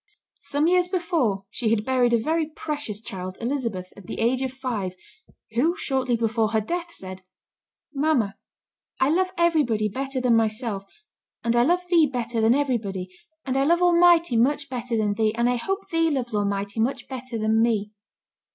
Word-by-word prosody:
Some 285 +1 -1
years 360 +1 +3
before 320 - 0
she 235 -4 -1
had 215 -1 +1
buried 255 -2 +2
a 235 - +4
very 315 +6 0
precious 295 -8 -5
child, 185 -3 -7
Elizabeth, 230 -8 -3
at 195 -3 -14
the - - -5
age 245 +3 +2
of 260 -1 -1
five, 235 -9 -4 0.6
who 310 +10 +2
shortly 260 -8 0
before 225 -1 0
her 220 - +4
death 340 +10 -3
said, 185 - -7 0.7
"Mamma, 275 -8 +1 0.7
I 265 +2 +3
love 370 +3 +2
everybody 295 -11 +2
better 270 +4 -3
than 250 -2 +3
myself, 220 -2 -1 0.6
and 235 0 +1
I 240 - +5
love 350 +8 +2
thee 335 -3 +5
better 235 -3 -2
than 225 +3 +4
everybody, 215 -10 -1 0.4
and 260 -1 -2
I 270 - +3
love 340 +4 +3
Almighty 345 -5 +5
much 280 +4 +1
better 245 -2 -2
than 210 -2 +1
thee, 215 +1 0
and 235 +1 +2
I 245 0 +1
hope 390 +10 -3
thee 330 -1 +2
loves 255 -6 -2
Almighty 200 0 -1
much 240 +5 -1
better 255 -2 -6
than 220 +1 +2
me." 215 -3 +1
245 Hz, 175 wpm, -24 LUFS, 220-295 Hz, 0.7 s, I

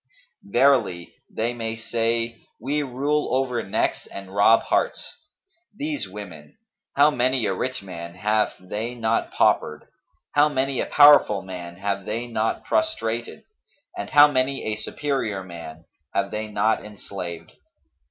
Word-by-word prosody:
Verily, 115 - +2 0.2
they 115 +2 -2
may 115 -1 -3
say, 115 0 -1 0.2
'We 145 +6 -1
rule 145 +2 -1
over 130 -2 0
necks - - -1
and 95 -1 -9
rob 105 +3 +5
hearts.' - - -1 0.6
These 295 0 -3
women! 95 -7 -10 0.4
how 145 +2 +6
many 130 -2 +1
a 95 - 0
rich 125 +4 -3
man 85 -2 -8
have 105 +3 +1
they 110 +6 -5
not 115 -1 0
paupered, 75 0 +1 0.5
how 145 +1 +4
many 135 -1 -1
a - - -3
powerful 145 -9 +6
man 90 -2 -8
have 100 +1 -3
they 115 +3 -3
not 115 -2 -2
prostrated 120 - -1 0.5
and - - -5
how 145 0 +8
many 135 -1 0
a 110 - -1
superior 110 -3 -2
man 85 -2 -10 0.3
have 100 0 0
they 110 0 -3
not 105 +1 +1
enslaved! 95 -5 -8
115 Hz, 135 wpm, -24 LUFS, 100-130 Hz, 0.6 s, how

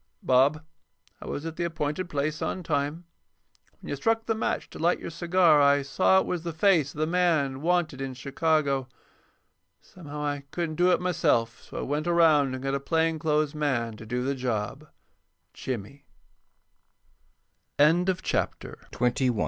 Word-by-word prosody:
_Bob: 140 +5 +3 0.6
I - - -9
was 145 - -4
at 165 0 -6
the 175 - -1
appointed 165 +1 -3
place 150 +2 -2
on 185 - -3
time. 150 +2 -2 0.7
When - - -11
you - - -1
struck 225 +10 0
the 225 - +1
match 220 - -2
to - - -10
light 170 +2 +2
your - - -7
cigar 170 -2 +4
I 140 0 +4
saw 185 +6 +3
it - - -1
was 180 -2 -2
the 170 0 -4
face 160 -4 +3
of - - -11
the 155 - +2
man 155 -6 +1
wanted 165 -5 0
in 135 -1 -4
Chicago. 140 -1 0 0.9
Somehow 150 -4 -9
I 145 -1 -3
couldn't 165 -2 -3
do 180 +1 +4
it - - +3
myself, 120 -10 0
so - - -10
I - - -2
went 150 +4 -2
around 155 -6 +4
and 130 - -7
got 135 0 -1
a 140 - 0
plain 160 +2 0
clothes 150 -2 +1
man 130 -7 -1
to 110 - -11
do 125 +2 -2
the 135 +2 0
job. 125 +3 -3 0.7
JIMMY. 125 +2 -6
150 Hz, 155 wpm, -27 LUFS, 140-170 Hz, 0.9 s, cigar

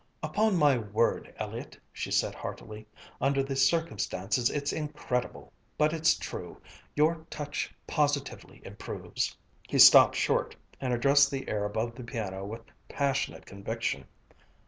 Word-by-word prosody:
"Upon 215 -2 +1
my 145 -5 +4
word, 110 +1 0
Elliott," - - -6 0.2
she - - -5
said - - +1
heartily, 110 0 -8 0.3
"under 135 +1 +2
the 135 0 -4
circumstances 125 - +1
it's 145 -1 -2
incredible, 125 - -4 0.2
but 155 +1 +3
it's 160 -1 +3
true - - -7 0.4
your 160 +2 +2
touch 145 -1 -4
positively 145 -2 -2
improves." - - -4 0.3
He - - 0
stopped - - +9
short, - - 0 0.2
and 130 - -2
addressed 140 +3 +4
the 135 -1 -5
air 105 -1 -1
above 110 +3 -2
the 125 - -9
piano 100 -5 -5
with 110 +3 -7 0.3
passionate 140 -2 -1
conviction. 100 - -4
130 Hz, 130 wpm, -29 LUFS, 110-145 Hz, 0.4 s, stopped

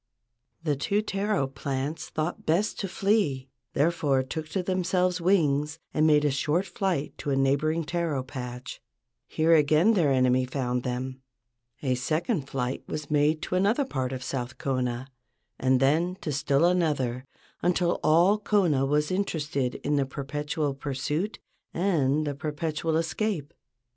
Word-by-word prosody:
The 150 -3 +1
two 200 +9 0
taro 200 -5 0
plants 135 +2 -4
thought 155 +3 -3
best 180 +7 +1
to 195 - -2
flee, 175 -10 0 0.2
therefore 145 -3 +2
took 155 +4 -5
to 190 +2 -1
themselves 180 0 +1
wings 155 -4 +2 0.2
and 155 0 +3
made 150 -1 +4
a 145 - +3
short 150 +7 0
flight 190 -10 -2
to - - -4
a 140 - +2
neighboring 145 +5 +2
taro 165 -4 -1
patch. 125 -2 -7 0.5
Here 160 +1 +2
again 155 +7 +5
their 165 -9 +3
enemy 130 -1 +3
found 125 -1 -2
them. 130 +1 -4 0.6
A 130 -2 +2
second 155 - -1
flight 125 -1 -2
was 150 -1 -5
made 150 +1 +2
to - - -4
another 205 +9 +2
part 130 - -2
of 130 -1 -5
South 125 -1 -4
Kona, 130 -2 -1 0.5
and 130 0 +3
then 165 +7 +2
to 155 - -3
still 145 +2 +2
another, 145 -8 +1 0.3
until 175 0 +1
all 175 +7 +5
Kona 175 -10 +2
was 150 +2 +1
inter¬ 190 -2 0
ested 140 -4 -2
in 145 0 0
the 140 - +2
perpetual 145 +2 -3
pursuit 145 +8 -3 0.4
and 155 -5 +2
the 145 - -1
perpetual 155 +2 -2
escape. 165 -1 -2
150 Hz, 150 wpm, -27 LUFS, 135-175 Hz, 0.6 s, again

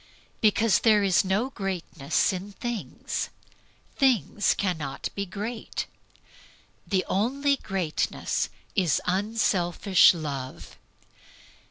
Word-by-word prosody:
Because 220 0 +4
there 215 -3 +4
is 190 -3 +4
no 205 +8 0
greatness 180 - -1
in 190 +2 -6
things. 240 0 -4 0.7
Things 230 - +2
cannot 160 -8 -2
be 200 0 -3
great. 215 +5 -4 1.0
The 190 -2 +1
only 275 +8 +1
greatness 190 -9 -1 0.3
is 175 -7 +2
unselfish 190 -2 +3
love. 140 -5 -6
195 Hz, 85 wpm, -26 LUFS, 175-220 Hz, 1.0 s, Because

